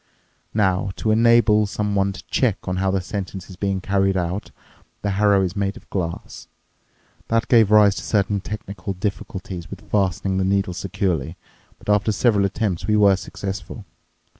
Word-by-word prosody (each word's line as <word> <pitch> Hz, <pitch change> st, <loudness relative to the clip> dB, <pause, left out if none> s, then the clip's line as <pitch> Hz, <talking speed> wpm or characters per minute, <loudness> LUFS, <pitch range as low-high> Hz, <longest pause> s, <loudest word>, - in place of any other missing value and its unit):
Now, 95 Hz, -3 st, +2 dB
to 110 Hz, -, 0 dB
enable 110 Hz, -2 st, +4 dB
someone 100 Hz, -1 st, 0 dB
to -, -, -10 dB
check 110 Hz, -7 st, -1 dB
on 90 Hz, 0 st, -1 dB
how 95 Hz, +1 st, +1 dB
the 95 Hz, 0 st, 0 dB
sentence 95 Hz, 0 st, -6 dB
is -, -, -10 dB
being 95 Hz, 0 st, -1 dB
carried 95 Hz, 0 st, +1 dB
out, 90 Hz, +3 st, -2 dB, 0.5 s
the 100 Hz, -, 0 dB
harrow 100 Hz, 0 st, +3 dB
is 95 Hz, +1 st, -2 dB
made 100 Hz, -1 st, -1 dB
of -, -, -16 dB
glass. 85 Hz, -3 st, -4 dB, 0.8 s
That 115 Hz, 0 st, +1 dB
gave 115 Hz, -4 st, +5 dB
rise 105 Hz, -2 st, +6 dB
to -, -, -5 dB
certain 100 Hz, -1 st, 0 dB
technical 100 Hz, -2 st, -6 dB
difficulties 95 Hz, -2 st, -5 dB
with -, -, -10 dB
fastening 95 Hz, -1 st, +1 dB
the -, -, +1 dB
needles 95 Hz, -2 st, 0 dB
securely, 90 Hz, -5 st, -2 dB, 0.4 s
but -, -, -19 dB
after 105 Hz, +1 st, +3 dB
several 105 Hz, -1 st, +2 dB
attempts 100 Hz, -3 st, -2 dB
we 105 Hz, -, +3 dB
were 100 Hz, -2 st, +5 dB
successful. 100 Hz, +1 st, -6 dB
100 Hz, 165 wpm, -22 LUFS, 95-105 Hz, 0.8 s, rise